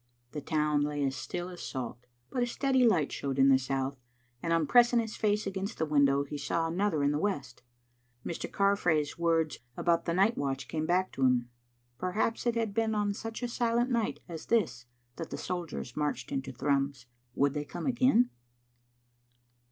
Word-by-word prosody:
The 150 - -5
town 150 -1 +1
lay 145 0 -1
as 135 0 -1
still 175 +6 -4
as 180 -1 -9
salt. 125 -2 -5 0.2
But 250 - -1
a 245 - +2
steady 260 +1 +2
light 165 -10 +2
showed 135 -1 -3
in 135 0 +6
the 130 -1 +6
south, 135 0 -2 0.4
and 165 - -2
on 165 -2 +3
pressing 240 +5 +5
his 225 -2 -3
face 210 0 +1
against 195 +2 -4
the 160 - 0
window 140 -2 +3
he 145 +1 -6
saw 165 +3 0
another 165 -2 0
in 140 - +3
the 150 - 0
west. 140 -11 -2 0.6
Mr. 170 - -4
Carfrae's 175 -7 +1
words 165 -2 +1 0.2
about 170 -1 +2
the 170 - 0
night 200 +5 +4
watch 135 -1 -2
came 155 +2 -2
back 185 +2 +2
to 135 - -3
him. 125 -2 +2 0.5
Perhaps 220 +6 -1
it 235 - +2
had 225 -3 -1
been 220 0 +1
on 205 -1 +1
such 225 +3 -6
a - - +1
silent 240 +1 +1
night 230 -3 0
as 165 -3 -8
this 125 - +1 0.3
that 165 - -5
the - - -5
soldiers 170 -8 -4
marched 150 -1 -2
into 135 -1 -3
Thrums. 140 0 -1 0.3
Would 140 0 +2
they 145 0 -2
come 170 +4 -6
again? 250 -1 +3
165 Hz, 185 wpm, -30 LUFS, 140-210 Hz, 0.6 s, in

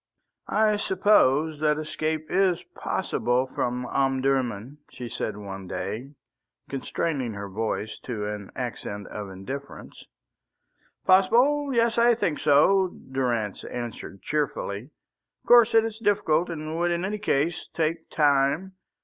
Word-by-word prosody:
"I 215 -1 +2
suppose 160 -7 +3
that 150 -1 +2
escape 155 0 -3
is 185 -2 +2
possible 125 +1 0
from 125 -1 -2
Omdurman," 135 -2 0
she 125 -1 -7
said 110 -2 -4
one 95 -2 -7
day, 115 +11 -5 0.5
constraining 135 -2 -2
her 100 0 -5
voice 110 +1 -3
to 110 -5 -3
an 105 -1 -5
accent 105 -5 -5
of 105 -2 -6
indifference. 130 +10 -8 1.0
"Possible? 245 +10 +4
Yes, 235 -1 +2
I 235 0 +5
think 170 -9 -1
so," 190 +7 +4 0.2
Durrance 120 -6 -1
answered 120 -5 -7
cheerfully. 125 -8 -2 0.6
"Of - - -31
course 235 -1 +7
it 225 0 +6
is 220 -1 -5
difficult 195 -7 +2
and 155 -1 -5
would 175 0 +2
in 175 +1 -1
any 210 +2 -3
case 160 -4 0
take 165 0 -1
time. 145 +5 +2
145 Hz, 125 wpm, -26 LUFS, 120-185 Hz, 1.0 s, course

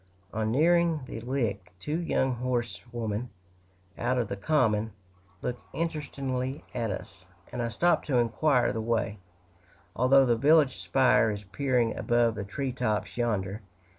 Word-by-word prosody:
On 110 0 0
nearing 165 +3 +3
the 120 - -6
Lick, 115 -7 -2
two 150 - -2
young 135 -6 +1
horsewomen, 120 -2 -3 0.7
out 125 +2 +1
of 120 -4 0
the - - -2
common, 110 -3 +1 0.5
look 125 0 -2
interestedly 140 -4 -3
at 115 -2 -1
us, 95 -1 -7 0.3
and 125 - -3
I 115 - 0
stop 170 +11 +2
to 135 -4 +1
inquire 125 +3 +2
the 110 - -2
way, 110 -2 -1 0.8
although 135 +2 +5
the 120 -2 +3
village 145 +2 +4
spire 130 -4 +3
is 105 -1 -4
peering 120 +3 0
above 120 -2 +2
the 105 - -4
tree 130 +7 -3
tops 110 -4 -2
yonder. 105 -4 -1
120 Hz, 140 wpm, -28 LUFS, 110-135 Hz, 0.8 s, although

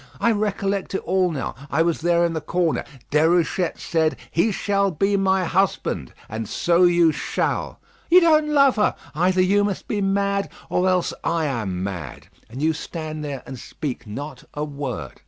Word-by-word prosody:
I 235 - +3
recollect 200 -2 -1
it - - -2
all 185 0 +2
now. 140 -7 -3 0.2
I 160 - +2
was 170 -1 0
there 170 +1 +3
in 170 - -1
the 160 - -3
corner; 170 +1 0 0.3
Déruchette 165 +3 +2
said, 160 -1 0 0.2
'He 190 +7 +2
shall 200 0 +1
be 195 +4 +1
my 190 -1 +2
husband;' 175 - 0 0.2
and 110 0 -5
so 175 +1 +3
you 175 -2 +5
shall. 150 - -2 0.3
You 355 +2 +8
don't 310 -3 +4
love 275 -4 +4
her! 210 - +2 0.2
Either 180 +4 +2
you 200 +2 +3
must 205 -1 -3
be 205 -2 -1
mad, 200 0 0 0.2
or 185 +1 +2
else 180 -1 +1
I 165 -1 0
am 105 -10 -2
mad. 90 -8 -6 0.2
And 130 +5 -6
you 160 +1 +3
stand 155 -1 -6
there, 140 -3 -5
and 130 -2 -8
speak 125 -5 -6
not 135 +5 -7
a 150 - -2
word. 140 - -5
170 Hz, 175 wpm, -23 LUFS, 150-195 Hz, 0.3 s, You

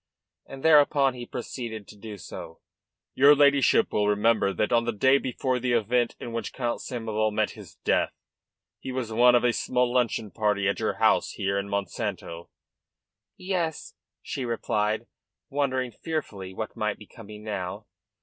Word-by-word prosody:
And 135 0 -10
thereupon 145 -3 +5
he 120 -1 -8
proceeded 115 -4 -6
to - - -13
do 105 0 -9
so: 90 - -9 0.5
"Your 140 +3 +7
ladyship 140 +9 +4
will 105 -1 +2
remember 105 0 +3
that 105 +3 -1
on 115 0 +3
the 120 - 0
day 130 +6 +4
before 130 0 -1
the 125 0 0
event 120 +1 +1
in 120 - -7
which 115 - -4
Count 120 -3 -2
Samoval 110 -3 -1
met 105 - 0
his - - -13
death - - +1 0.7
he 130 - -6
was 125 -3 -3
one 120 +2 +6
of 120 - +3
a 120 -1 +3
small 125 0 0
luncheon 115 -4 0
party 105 -3 +1
at 100 - 0
your - - 0
house - - +2
here 100 0 -1
in 100 0 -5
Monsanto." 100 -4 -4 0.9
"Yes," 180 -4 -3 0.3
she 135 - -4
replied, 110 -2 -1 0.5
wondering 130 -3 0
fearfully 105 - -5
what 110 +3 -6
might 105 -1 -1
be 105 - -13
coming 105 0 -12
now. 95 -4 -4
115 Hz, 160 wpm, -26 LUFS, 105-130 Hz, 0.9 s, Your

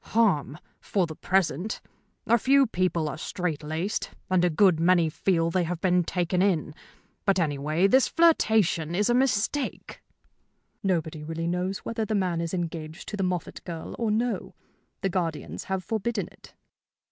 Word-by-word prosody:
"Harm, 175 -11 +2 0.2
for 190 -3 0
the 160 -1 -8
present. 190 +2 0 0.5
A 235 +1 +4
few 275 +4 +5
people 180 -7 0
are 150 +1 -5
straitlaced, 165 +2 -3 0.2
and 185 -1 +3
a 180 - +4
good 175 0 +4
many 170 -1 +4
feel 165 0 +1
they 180 +1 +1
have 170 0 -3
been 180 0 +3
taken 180 +1 0
in. 175 -6 +1 0.5
But, 195 -2 +2
anyway, 155 +1 +1
this 260 +7 +5
flirtation 220 - +3
is 210 +5 +2
a - - +4
mistake." 260 +2 0 0.8
"Nobody 160 -5 -1
really 165 +2 -4
knows 180 +3 -2
whether 230 -1 -2
the 215 0 -1
man 180 -4 0
is 165 -1 -3
engaged 165 -1 -5
to - - -4
the 200 - -3
Moffatt 180 -2 -3
girl 165 -2 -6
or 230 -2 0
no. 230 +3 -1 0.5
The 195 - 0
guardians 160 - -3
have 190 -1 -2
forbidden 220 -1 -2
it." - - -18
180 Hz, 160 wpm, -26 LUFS, 165-205 Hz, 0.8 s, few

